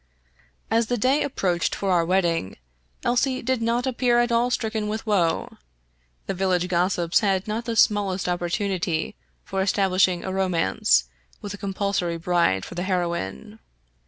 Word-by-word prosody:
As 225 Hz, 0 st, +2 dB
the 245 Hz, -, 0 dB
day 260 Hz, +6 st, +2 dB
approached 180 Hz, -10 st, 0 dB
for 195 Hz, -1 st, -1 dB
our 175 Hz, -2 st, +3 dB
wedding 170 Hz, -, 0 dB, 0.5 s
Elsie 255 Hz, +2 st, +1 dB
did 255 Hz, -1 st, 0 dB
not 235 Hz, +2 st, 0 dB
appear 250 Hz, -2 st, +1 dB
at 240 Hz, 0 st, +2 dB
all 235 Hz, +1 st, +2 dB
stricken 220 Hz, -3 st, -2 dB
with 215 Hz, +1 st, -4 dB
woe. 180 Hz, -7 st, 0 dB, 0.7 s
The -, -, -2 dB
village 180 Hz, -1 st, 0 dB
gossips 175 Hz, -1 st, +1 dB
had 195 Hz, -2 st, 0 dB
not 220 Hz, +2 st, -3 dB
the 230 Hz, -1 st, -2 dB
smallest 200 Hz, -4 st, +2 dB
opportunity 175 Hz, -1 st, -1 dB, 0.3 s
for 195 Hz, 0 st, -3 dB
establishing 190 Hz, -2 st, +2 dB
a 190 Hz, -, -4 dB
romance, 165 Hz, -, +2 dB, 0.4 s
with 205 Hz, -1 st, -6 dB
a -, -, -7 dB
compulsory 195 Hz, -3 st, -1 dB
bride 170 Hz, -, +1 dB
for -, -, -9 dB
the 175 Hz, -, -4 dB
heroine. 170 Hz, -, -3 dB
190 Hz, 150 wpm, -24 LUFS, 175-225 Hz, 0.7 s, our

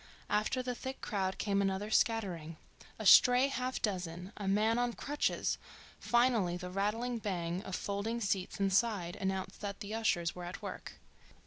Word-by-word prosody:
After 215 Hz, +5 st, +1 dB
the 250 Hz, 0 st, -2 dB
thick 260 Hz, +2 st, -6 dB
crowd 190 Hz, -3 st, -1 dB
came 200 Hz, -1 st, +1 dB
another 195 Hz, +2 st, -1 dB
scattering; 180 Hz, -10 st, +1 dB, 0.4 s
a 220 Hz, -, -6 dB
stray 250 Hz, +6 st, +7 dB
half 255 Hz, -1 st, -2 dB
dozen; 180 Hz, -1 st, -3 dB
a 200 Hz, -, -5 dB
man 215 Hz, +4 st, +3 dB
on 245 Hz, -1 st, 0 dB
crutches; 290 Hz, +4 st, -1 dB, 0.4 s
finally 235 Hz, -8 st, +2 dB
the 180 Hz, 0 st, -7 dB
rattling 225 Hz, +5 st, -1 dB
bang 180 Hz, -4 st, -2 dB
of 190 Hz, -2 st, -5 dB
folding 205 Hz, +4 st, -2 dB
seats 195 Hz, -4 st, -1 dB
inside 195 Hz, -2 st, +1 dB
announced 190 Hz, -1 st, -3 dB
that 200 Hz, -1 st, -4 dB
the 210 Hz, 0 st, -6 dB
ushers 185 Hz, -6 st, +1 dB
were 180 Hz, -1 st, -7 dB
at 175 Hz, +1 st, -6 dB
work. -, -, -6 dB
200 Hz, 155 wpm, -33 LUFS, 185-230 Hz, 0.4 s, stray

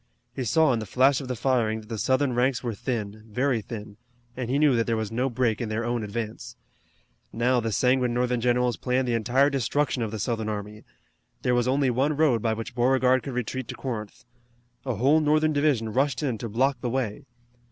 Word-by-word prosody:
He 130 Hz, -, -3 dB
saw 155 Hz, +4 st, +3 dB
in 115 Hz, -, 0 dB
the 110 Hz, -, -6 dB
flash 130 Hz, +6 st, +3 dB
of 135 Hz, -, -7 dB
the 125 Hz, -, -2 dB
firing 115 Hz, -3 st, 0 dB
that 105 Hz, -, -16 dB
the 110 Hz, -2 st, -4 dB
Southern 130 Hz, +2 st, +1 dB
ranks 125 Hz, +2 st, +1 dB
were 120 Hz, -2 st, -2 dB
thin, 110 Hz, -2 st, -4 dB
very 125 Hz, +1 st, 0 dB
thin, 105 Hz, -2 st, -8 dB, 0.4 s
and 125 Hz, -2 st, -4 dB
he 135 Hz, -, +1 dB
knew 145 Hz, -3 st, +4 dB
that 115 Hz, -1 st, +1 dB
there 115 Hz, -1 st, +1 dB
was 110 Hz, -1 st, -3 dB
no 125 Hz, +4 st, 0 dB
break 120 Hz, -3 st, 0 dB
in 115 Hz, -, -3 dB
their 110 Hz, +2 st, -2 dB
own 120 Hz, -1 st, -1 dB
advance. 110 Hz, +1 st, -5 dB, 0.8 s
Now 125 Hz, +2 st, +2 dB
the 115 Hz, -1 st, -2 dB
sanguine 125 Hz, +3 st, +2 dB
Northern 125 Hz, 0 st, 0 dB
generals 125 Hz, 0 st, +1 dB
planned 125 Hz, 0 st, 0 dB
the 120 Hz, -, 0 dB
entire 125 Hz, +5 st, +2 dB
destruction 135 Hz, +1 st, 0 dB
of 110 Hz, -, -1 dB
the 110 Hz, -, -5 dB
Southern 110 Hz, 0 st, -2 dB
army. 105 Hz, 0 st, -6 dB, 0.6 s
There 125 Hz, -, +2 dB
was 120 Hz, 0 st, +2 dB
only 135 Hz, 0 st, +2 dB
one 140 Hz, +5 st, 0 dB
road 140 Hz, -8 st, +3 dB
by 115 Hz, 0 st, +1 dB
which 115 Hz, +3 st, -6 dB
Beauregard 130 Hz, +1 st, +3 dB
could 130 Hz, +2 st, -6 dB
retreat 125 Hz, +1 st, -3 dB
to -, -, -6 dB
Corinth. 110 Hz, -6 st, -6 dB, 0.6 s
A 125 Hz, -, 0 dB
whole 140 Hz, +9 st, +4 dB
Northern 155 Hz, +1 st, +2 dB
division 140 Hz, -7 st, +1 dB
rushed 135 Hz, 0 st, +1 dB
in 125 Hz, -7 st, -1 dB
to 115 Hz, -, -5 dB
block 130 Hz, +3 st, +1 dB
the 125 Hz, -, -2 dB
way. 125 Hz, -1 st, -3 dB
125 Hz, 215 wpm, -26 LUFS, 115-130 Hz, 0.8 s, knew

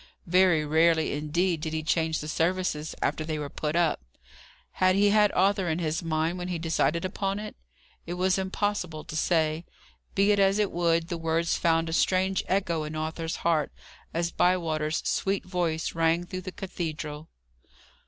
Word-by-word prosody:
Very 180 Hz, -3 st, +4 dB
rarely 160 Hz, +1 st, +3 dB
indeed 160 Hz, +3 st, 0 dB
did 160 Hz, 0 st, -3 dB
he 160 Hz, 0 st, -2 dB
change 160 Hz, 0 st, 0 dB
the 150 Hz, -, -6 dB
services 165 Hz, -1 st, -1 dB
after 155 Hz, -, 0 dB
they 155 Hz, 0 st, -3 dB
were 145 Hz, -1 st, -5 dB
put 150 Hz, +1 st, -3 dB
up. 170 Hz, -2 st, +2 dB, 0.7 s
Had 185 Hz, 0 st, +2 dB
he 200 Hz, +1 st, +4 dB
had 210 Hz, -1 st, +4 dB
Arthur 195 Hz, -1 st, +2 dB
in 160 Hz, -, 0 dB
his 160 Hz, -2 st, -1 dB
mind 165 Hz, +1 st, -1 dB
when 180 Hz, -, -4 dB
he 180 Hz, -2 st, -2 dB
decided 165 Hz, +1 st, 0 dB
upon 195 Hz, +1 st, -2 dB
it? 210 Hz, 0 st, -6 dB, 0.5 s
It 175 Hz, -, -3 dB
was 185 Hz, +1 st, +1 dB
impossible 190 Hz, -4 st, -2 dB
to -, -, -8 dB
say. 160 Hz, 0 st, +1 dB, 0.5 s
Be 200 Hz, +1 st, +4 dB
it 205 Hz, -, +2 dB
as 195 Hz, 0 st, +4 dB
it 210 Hz, -2 st, +1 dB
would, 170 Hz, -1 st, +1 dB
the 170 Hz, -2 st, -3 dB
words 165 Hz, +1 st, 0 dB
found 165 Hz, 0 st, +2 dB
a 165 Hz, -, -3 dB
strange 190 Hz, +2 st, +2 dB
echo 175 Hz, -4 st, 0 dB
in 155 Hz, +1 st, -6 dB
Arthur's 160 Hz, +1 st, -3 dB
heart, 160 Hz, -3 st, +2 dB, 0.4 s
as 170 Hz, +1 st, -1 dB
Bywater's 160 Hz, -4 st, +1 dB
sweet 195 Hz, +1 st, 0 dB
voice 175 Hz, -3 st, -1 dB
rang 165 Hz, +1 st, +1 dB
through 185 Hz, +1 st, -6 dB
the 185 Hz, -, -6 dB
cathedral. 155 Hz, -5 st, -5 dB
170 Hz, 175 wpm, -27 LUFS, 160-185 Hz, 0.7 s, Very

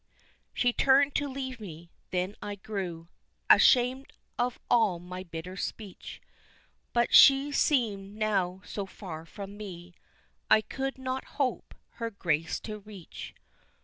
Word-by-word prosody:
She 245 Hz, -1 st, +1 dB
turned 275 Hz, +2 st, +4 dB
to 285 Hz, -, 0 dB
leave 260 Hz, -2 st, -5 dB
me, 170 Hz, -4 st, -10 dB, 0.2 s
then 185 Hz, +3 st, -1 dB
I 205 Hz, 0 st, -4 dB
grew 190 Hz, -5 st, -5 dB, 0.4 s
Ashamed 255 Hz, +2 st, +5 dB, 0.3 s
of 245 Hz, 0 st, 0 dB
all 220 Hz, -7 st, +3 dB
my 180 Hz, +1 st, -7 dB
bitter 170 Hz, +1 st, -7 dB
speech, 200 Hz, 0 st, -6 dB, 0.7 s
But 240 Hz, -1 st, +1 dB
she 275 Hz, +1 st, +8 dB
seemed 210 Hz, -9 st, +1 dB
now 195 Hz, -3 st, 0 dB
so 200 Hz, -2 st, -5 dB
far 165 Hz, -5 st, -8 dB
from 200 Hz, +1 st, -8 dB
me, 180 Hz, -4 st, -9 dB, 0.6 s
I 215 Hz, -, +7 dB
could 270 Hz, +4 st, -4 dB
not 260 Hz, 0 st, -3 dB
hope 270 Hz, -3 st, -1 dB, 0.3 s
her 230 Hz, -, -1 dB
grace 165 Hz, -6 st, -1 dB
to 215 Hz, -1 st, -6 dB
reach. 200 Hz, -4 st, -10 dB
205 Hz, 130 wpm, -29 LUFS, 180-250 Hz, 0.7 s, she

